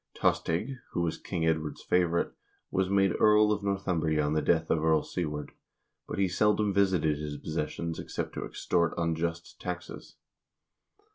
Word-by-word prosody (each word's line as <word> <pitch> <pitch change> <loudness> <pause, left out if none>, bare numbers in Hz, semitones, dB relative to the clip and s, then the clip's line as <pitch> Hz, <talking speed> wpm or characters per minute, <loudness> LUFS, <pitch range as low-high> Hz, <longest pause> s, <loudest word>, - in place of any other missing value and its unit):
Tostig, 110 +11 0 0.2
who 85 - 0
was 85 -2 -1
King 80 -1 -2
Edward's 80 -2 -1
favorite, 85 -1 +1 0.4
was 95 -1 +1
made 95 -2 +3
Earl 105 0 +6
of 105 -1 0
Northumbria 90 -6 0
on 75 - 0
the 80 - +2
death 80 -1 +2
of 80 -1 +2
Earl 80 -1 +3
Siward, 75 -4 -4 0.6
but - - -5
he 100 -1 +3
seldom 105 +2 +2
visited 90 -7 +2
his 75 -1 -4
possessions 80 +2 -3
except - - -4
to - - -4
extort 85 -1 0
unjust 85 0 -2
taxes. 90 0 -6
85 Hz, 150 wpm, -29 LUFS, 80-95 Hz, 0.6 s, Earl